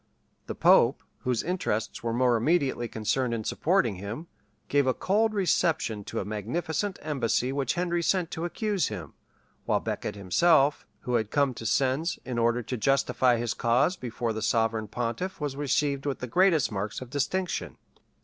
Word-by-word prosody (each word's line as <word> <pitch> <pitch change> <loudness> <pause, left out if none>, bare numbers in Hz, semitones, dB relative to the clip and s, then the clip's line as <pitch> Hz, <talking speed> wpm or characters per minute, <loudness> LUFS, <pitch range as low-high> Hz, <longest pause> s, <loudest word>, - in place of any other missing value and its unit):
] - - -43
The - - -4
pope, - - +4 0.2
whose 125 -2 -1
interests 135 - -2
were 115 - -2
more 120 +1 +3
immediately 130 -1 +1
concerned 115 +3 -1
in 110 - -4
supporting 135 - +1
him, 105 - -6 0.4
gave 140 -1 +2
a 130 - +2
cold 215 +3 +1
reception 160 - +1
to - - -4
a - - -3
magnificent 155 - -2
embassy 130 -4 0
which 140 0 -1
Henry 175 -1 0
sent 175 -1 +1
to 160 - -4
accuse 200 +2 -1
him; 90 -9 -7 0.5
while - - +2
Becket - - -4
himself, 140 - +3
who 125 - -3
had 110 -3 +1
come 140 -1 +2
to 115 -1 -5
Sens 135 - +1
in 125 -2 -2
order 120 +1 +2
to 125 +3 -4
justify 130 0 +2
his 115 -1 -1
cause 125 +10 +2
before 120 -5 -3
the 110 - -4
sovereign 115 -1 +1
pontiff 120 - -3
was 145 -3 -3
received 145 0 0
with 140 - -1
the - - -5
greatest 165 +1 +3
marks 105 +1 -3
of 130 -1 -10
distinction. 175 +6 -2
130 Hz, 170 wpm, -27 LUFS, 115-160 Hz, 0.5 s, pope